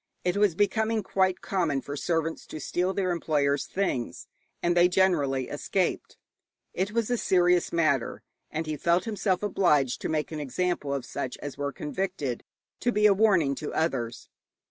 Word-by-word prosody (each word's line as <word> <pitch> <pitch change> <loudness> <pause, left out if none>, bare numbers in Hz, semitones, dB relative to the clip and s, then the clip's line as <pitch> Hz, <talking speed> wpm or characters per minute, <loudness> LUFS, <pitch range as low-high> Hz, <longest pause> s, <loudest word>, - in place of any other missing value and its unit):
It 180 0 +1
was 200 -4 +3
becoming 220 +2 +1
quite 185 0 +1
common 170 -8 0
for 140 +1 -6
servants 165 +1 -2
to 155 - -7
steal 180 +5 -1
their 190 -2 0
employers' 145 -4 0
things, 185 -11 -2 0.4
and 175 0 +2
they 175 0 +6
generally 150 -9 +2
escaped. - - -2 0.6
It 190 +3 -1
was 230 +1 0
a 245 - +1
serious 180 -1 +3
matter, 155 -7 +1 0.3
and 160 +1 -3
he 155 -1 -3
felt 170 +6 +2
himself 205 -4 0
obliged 150 -10 +2
to - - -2
make 155 0 -1
an 155 - -4
example 150 +1 -1
of 140 -3 -2
such 125 - -4
as 145 -2 -7
were 140 0 -2
convicted, 150 -5 -3 0.4
to 245 - +1
be 210 -2 +2
a 210 - +7
warning 190 -9 +3
to 150 - -5
others. 125 -8 -1
175 Hz, 165 wpm, -27 LUFS, 145-190 Hz, 0.6 s, a